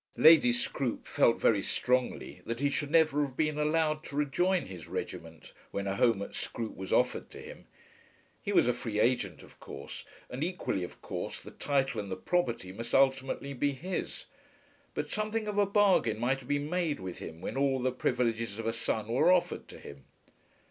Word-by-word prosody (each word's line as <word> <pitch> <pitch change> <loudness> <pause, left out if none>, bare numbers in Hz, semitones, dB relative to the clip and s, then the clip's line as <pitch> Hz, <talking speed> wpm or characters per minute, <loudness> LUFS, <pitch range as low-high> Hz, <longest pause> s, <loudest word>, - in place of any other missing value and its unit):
Lady 165 +10 +8
Scroope 140 - -1
felt 115 - +3
very 105 -3 +3
strongly 125 +5 -1
that 115 0 -2
he 140 0 +1
should 145 0 -2
never 155 -2 +4
have 135 -3 -3
been 150 -1 +1
allowed 155 0 +1
to 140 - -8
rejoin 175 +6 +1
his 90 -5 -9
regiment, 80 -3 -6 0.2
when 100 - -3
a 95 0 -1
home 110 -2 +3
at - - -8
Scroope 115 -2 -4
was 95 0 -7
offered - - +2
to - - -11
him. - - -11 0.7
He - - -3
was - - +4
a - - +3
free 105 -2 -3
agent 120 +3 +1
of - - -17
course, 70 - -8 0.2
and 130 +4 -4
equally 175 - -2
of 90 - -9
course - - -4
the - - -11
title 135 -5 0
and 100 - -8
the - - -1
property 120 - -1
must 115 +5 -3
ultimately 135 +1 +2
be 140 +2 0
his. 175 +8 -4 0.7
But - - -3
something 215 +1 -1
of 205 -1 0
a 200 - +4
bargain 195 - +3
might 125 +4 +1
have 125 - -14
been 145 0 0
made 170 -3 -1
with 95 -1 -6
him 80 0 -8
when 90 - -5
all 135 -1 +2
the 130 0 0
privileges 115 -4 -1
of 115 - -5
a 115 - 0
son 115 -2 -2
were 135 +10 +4
offered 180 -1 +1
to - - -11
him. 70 -1 -12
135 Hz, 195 wpm, -30 LUFS, 115-155 Hz, 0.7 s, Lady